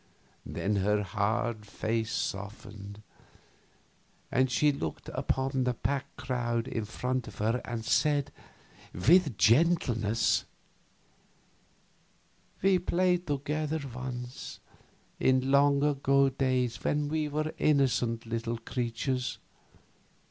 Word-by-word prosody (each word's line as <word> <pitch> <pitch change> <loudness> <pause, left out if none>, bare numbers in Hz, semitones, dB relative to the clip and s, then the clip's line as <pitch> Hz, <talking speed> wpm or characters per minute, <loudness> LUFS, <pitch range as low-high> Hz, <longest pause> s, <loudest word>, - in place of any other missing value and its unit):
Then 105 +1 -1
her 105 +2 +2
hard 105 +3 -1
face 110 +2 -2
softened, 100 +1 -5 1.3
and 130 +1 +3
she 145 +5 +3
looked 80 - -5
upon 130 0 0
the 125 -1 0
packed 140 +3 -3
crowd 120 -2 -1
in 115 -4 -3
front 125 +3 -2
of 105 - -10
her 115 +4 0
and 115 -2 -4
said, 145 +1 +2 0.6
with 145 - +4
gentleness: 115 -5 +3 2.2
"We 190 -1 +5
played 180 0 +1
together 150 +2 -1
once, 125 0 -6 0.6
in 130 +1 +2
long 140 0 +4
agone 140 -2 +3
days 130 -3 0
when 150 0 +1
we 155 0 -1
were 155 +2 -2
innocent 125 -6 +2
little 115 0 -2
creatures. 125 +2 -2
125 Hz, 100 wpm, -30 LUFS, 115-145 Hz, 2.2 s, We